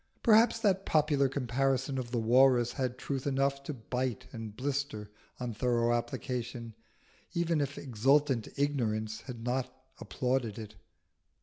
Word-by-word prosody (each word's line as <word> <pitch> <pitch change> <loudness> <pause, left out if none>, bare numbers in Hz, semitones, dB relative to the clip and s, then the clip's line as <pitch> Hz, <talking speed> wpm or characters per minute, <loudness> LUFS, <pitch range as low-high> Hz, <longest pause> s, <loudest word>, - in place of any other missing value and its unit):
Perhaps 230 0 +6
that 195 -3 +2
popular 145 -5 +2
comparison 135 +1 0
of 120 -2 -5
the 120 - -2
Walrus 120 +1 +4
had 130 -2 -2
truth 135 0 -3
enough 140 0 +1
to - - -3
bite 125 0 -3
and 110 -2 -7
blister 135 -6 -3 0.3
on 125 -2 -3
thorough 120 +1 +1
application, 120 -1 -3 0.6
even 170 -2 +1
if 140 0 -3
exultant 135 0 +2
ignorance 110 -6 -1
had 120 -3 -7
not 125 +1 -1 0.3
applauded 125 -4 -1
it. 110 -1 -8
130 Hz, 130 wpm, -31 LUFS, 115-140 Hz, 0.6 s, Perhaps